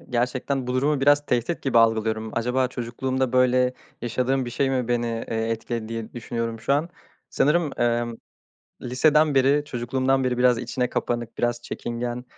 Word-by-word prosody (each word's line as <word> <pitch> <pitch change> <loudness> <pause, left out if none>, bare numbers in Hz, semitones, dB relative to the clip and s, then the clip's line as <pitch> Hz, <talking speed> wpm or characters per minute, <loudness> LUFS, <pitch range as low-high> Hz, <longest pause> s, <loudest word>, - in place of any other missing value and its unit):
eee, - - -19
gerçekten 125 +2 -1
bu 125 - -2
durumu 145 +2 +1
biraz 145 +1 +4
tehdit 125 +8 -1
gibi 130 -4 +3
algılıyorum. 110 -1 +2
Acaba 125 +2 +1
çocukluğumda 130 +1 -2
böyle 125 0 +3 0.3
yaşadığım 125 +2 0
bir 120 - -5
şey 135 +3 0
mi 125 -3 -1
beni, 120 -1 +1
eee, 115 -1 -2
etkiledi 115 0 -3
diye 115 -1 -5
düşünüyorum 115 -1 -4
şu 135 - 0
an. 150 +4 +1 0.4
Sanırım, 150 +1 +1
emm, 120 -1 0 0.7
liseden 150 +4 +3
beri, 140 +2 +3
çocukluğumdan 130 0 0
beri 125 -1 0
biraz 125 -1 +4
içine 125 +1 -2
kapanık, 120 -1 -3
biraz 120 0 0
çekingen, 120 +1 -4
125 Hz, 160 wpm, -24 LUFS, 120-135 Hz, 0.7 s, biraz